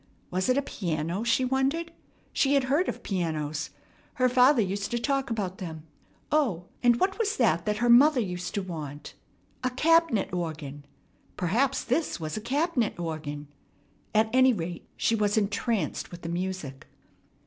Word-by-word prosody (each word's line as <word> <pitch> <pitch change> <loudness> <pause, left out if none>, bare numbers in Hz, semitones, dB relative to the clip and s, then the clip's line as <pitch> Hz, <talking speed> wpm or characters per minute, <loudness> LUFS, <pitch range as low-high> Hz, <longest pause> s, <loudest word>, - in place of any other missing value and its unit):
Was 185 +5 0
it 255 - +3
a 280 - +1
piano? 170 - -2
she 235 +2 +2
wondered. 270 +6 0 0.4
She 280 0 +3
had 275 - +3
heard 285 +8 +1
of - - -6
pianos. 155 -5 -2 0.5
Her 255 -3 +3
father 250 0 +5
used 200 +1 -3
to 240 - -1
talk 275 +2 0
about 195 -5 -3
them. 160 -4 -7 0.5
O, 240 - +1 0.2
and 240 -1 +4
what 385 +3 +1
was 430 -2 0
that 185 -7 +2
her 240 +3 +1
mother 260 +4 +7
used 180 -5 -3
to 200 - -1
want? 150 -5 -7 0.5
A 255 - +2
"cab'net 290 - +2
organ." 150 -5 -4 0.5
Perhaps 240 +10 +1
this 325 - -1
was 155 -1 -4
a 215 - -4
cab'net 270 - 0
organ. 150 -3 -5 0.7
At 220 +1 +3
any 260 0 +6
rate, 170 -4 -5
she - - +1
was 210 -1 +1
entranced 215 +1 -1
with 175 -1 -11
the 165 - -4
music. 175 -6 -4
215 Hz, 160 wpm, -27 LUFS, 170-260 Hz, 0.7 s, mother